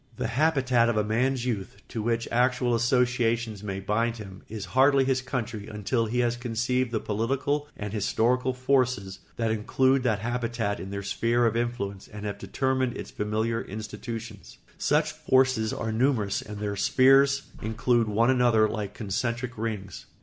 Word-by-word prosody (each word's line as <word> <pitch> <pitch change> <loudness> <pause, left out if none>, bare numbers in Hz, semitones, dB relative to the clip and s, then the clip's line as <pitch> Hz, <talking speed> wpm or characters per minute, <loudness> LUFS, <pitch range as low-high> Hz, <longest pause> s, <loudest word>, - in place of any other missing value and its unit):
The - - -2
habitat 130 -3 +2
of 115 - 0
a 105 - +3
man's 125 +4 0
youth, 100 -6 -3
to 115 - -4
which 115 +1 -1
actual 125 0 +2
associations 120 -2 +1
may 100 -2 -4
bind 115 +4 0
him, 95 -3 -10
is 105 -2 -5
hardly 135 0 +5
his 130 -1 +1
country 115 -5 -4
until 110 +2 -1
he 125 +3 0
has 120 -1 +1
conceived 120 +1 -1
the 110 - 0
political 135 +8 -1
and 105 -1 -5
historical 120 +5 +1
forces 125 -7 0 0.2
that 115 -1 0
include 130 +5 +2
that 115 -5 +1
habitat 115 -1 -2
in 95 +3 -6
their 100 0 -4
sphere 115 +4 +1
of 115 -1 +1
influence 115 -5 -3
and 105 0 -8
have 100 -1 -4
determined 130 +5 -1
its - - -7
familiar 110 +2 -1
institutions. 110 +2 -7 0.2
Such - - +2
forces 130 -4 +2
are 110 - -3
numerous 110 -4 +1
and 105 -1 -8
their 105 0 -3
spheres 135 +6 +4 0.2
include 115 +1 +1
one 115 +4 +3
another 120 -4 +4
like 105 -2 -4
concentric 120 +4 -2
rings. 105 -4 -5
115 Hz, 160 wpm, -27 LUFS, 105-125 Hz, 0.2 s, hardly